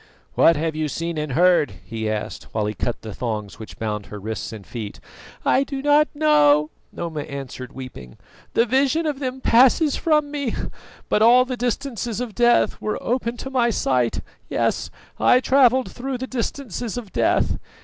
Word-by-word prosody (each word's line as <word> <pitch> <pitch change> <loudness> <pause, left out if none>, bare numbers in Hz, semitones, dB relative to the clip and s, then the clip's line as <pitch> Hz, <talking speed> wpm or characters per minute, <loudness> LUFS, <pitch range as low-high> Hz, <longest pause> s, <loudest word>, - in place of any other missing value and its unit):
"What 165 - +5
have 160 +1 -2
you 155 0 -1
seen 165 +2 -3
and 150 -3 -3
heard?" 175 - +4
he 110 +1 -3
asked, 110 -1 -4
while 110 -2 +1
he 105 - -2
cut 120 +2 -3
the 110 -2 -6
thongs 110 -3 -4
which 110 - -10
bound 105 -2 -3
her 105 - -8
wrists 110 +1 -5
and 105 -4 -9
feet. 110 -4 -7 0.5
"I 270 - +4
do 275 -1 -5
not 295 +1 +5
know," 150 - +4 0.2
Noma 160 -3 -4
answered 135 -3 -7
weeping; 125 - -10 0.4
"the 230 - +4
vision 275 +6 +2
of 295 -3 -2
them 260 -1 -4
passes 265 +6 +4
from 300 -3 +1
me; 280 -5 -2 0.5
but 210 - +1
all 245 +3 +6
the 255 0 -3
distances 240 -3 -2
of 245 -3 -4
death 240 +1 +3
were 215 - -2
open 240 -1 -2
to 265 - -7
my 245 -3 +2
sight; 125 - 0 0.3
yes, - - 0 0.3
I 250 - +5
travelled 260 -1 +3
through 260 +1 -4
the 260 - -4
distances 245 -2 -4
of 220 -6 -7
death. - - +1
220 Hz, 175 wpm, -22 LUFS, -, 0.5 s, all